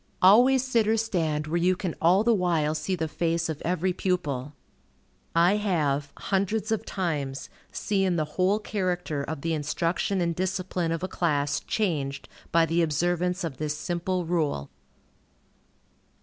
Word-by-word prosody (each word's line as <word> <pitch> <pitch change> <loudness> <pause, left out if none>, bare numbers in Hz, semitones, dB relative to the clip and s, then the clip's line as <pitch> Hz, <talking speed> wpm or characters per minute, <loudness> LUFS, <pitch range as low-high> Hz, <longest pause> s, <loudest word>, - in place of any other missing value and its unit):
Always 245 +7 +6
sit 230 -4 +2
or 220 +1 +3
stand 165 -9 0
where 165 +3 -1
you 185 +1 +3
can 180 -2 -3
all 180 +5 +5
the 235 +1 +4
while 170 -6 +1
see 155 +5 -2
the 160 -2 -2
face 165 +1 -1
of 155 -2 -4
every 180 +2 0
pupil. 150 -7 -2 0.8
I 175 +5 +5
have, 150 -8 0
hundreds 205 +3 -1
of 220 - -1
times, 145 -8 -3 0.2
seen 195 -3 0
the 155 -2 0
whole 190 +3 +2
character 180 -8 -2
of 150 0 -5
the 165 +1 -1
instruction 165 +5 -1
and 170 -1 0
discipline 185 -2 -1
of 165 +1 -2
a - - 0
class 145 -6 0
changed 150 - -2 0.2
by 165 0 +4
the 165 +2 +1
observance 175 +3 0
of 155 -6 -4
this 150 +1 -2
simple 175 +2 -2
rule. 155 - -1
175 Hz, 150 wpm, -26 LUFS, 155-190 Hz, 0.8 s, Always